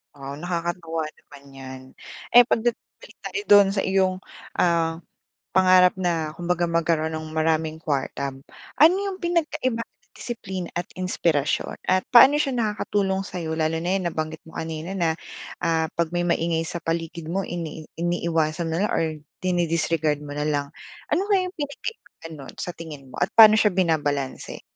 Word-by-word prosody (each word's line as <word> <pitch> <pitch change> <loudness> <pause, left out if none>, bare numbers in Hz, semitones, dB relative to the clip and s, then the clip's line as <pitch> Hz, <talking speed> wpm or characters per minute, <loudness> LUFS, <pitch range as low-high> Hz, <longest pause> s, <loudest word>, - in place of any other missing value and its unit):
Oo 140 0 -7
nakakatawa 170 -1 -3
naman 140 -1 -17
'yan. 130 -1 -9 0.5
Eh 245 0 +8
'pag 225 - +1
dat 240 -1 +1 0.3
balik - - -14
tayo 405 - -4
do'n 205 -1 +9
sa 195 - +1
iyong, 190 -1 +2 0.4
ah, 165 -1 +1 0.5
pangarap 185 0 +5
na 165 -4 0
kumbaga 175 -1 0
magkaroon 165 -1 +1
ng 155 0 -5
maraming 160 0 0
kuwarta. 140 -1 -2 0.5
Ano 325 +4 +7
'yong 390 -2 -4
pinagkaiba 310 -9 -1
ng - - -20
disiplina 190 -7 -6
at 175 - -3
inspirasyon 170 -5 0 0.2
at 185 0 +2
paano 265 +4 +9
siya 295 -2 +1
nakakatulong 205 -4 0
sa'yo 165 -3 -4
lalo 160 +1 +1
na 175 - -1
yan 180 - -3
nabanggit 155 0 -4
mo 160 - -14
kanina 160 +3 -5
na, 170 -4 +1 0.5
ah, 165 -2 0
'pag 170 0 0
may 175 - +1
maingay 170 -1 +1
sa 170 +1 -5
paligid 165 0 -4
mo 185 +4 -1
ini 165 -3 -5 0.2
iniiwasan 165 -1 0
mo 165 - -1
na 205 - +2
lang - - -3
or - - +2 0.4
dini 175 -2 +1
disregard 160 -2 0
mo 145 - -8
na 150 - -1
lang. 145 -1 -1 0.4
Ano 385 - +1
kayang 380 -3 +2
pinagkaiba 285 - -7
nun 135 - -10
sa 175 - -5
tingin 150 -6 -10
mo - - -10
at 185 - -1
paano 215 -1 +9
siya 210 -5 +3
binabalanse? 145 -7 -1
170 Hz, 165 wpm, -24 LUFS, 160-190 Hz, 0.5 s, do'n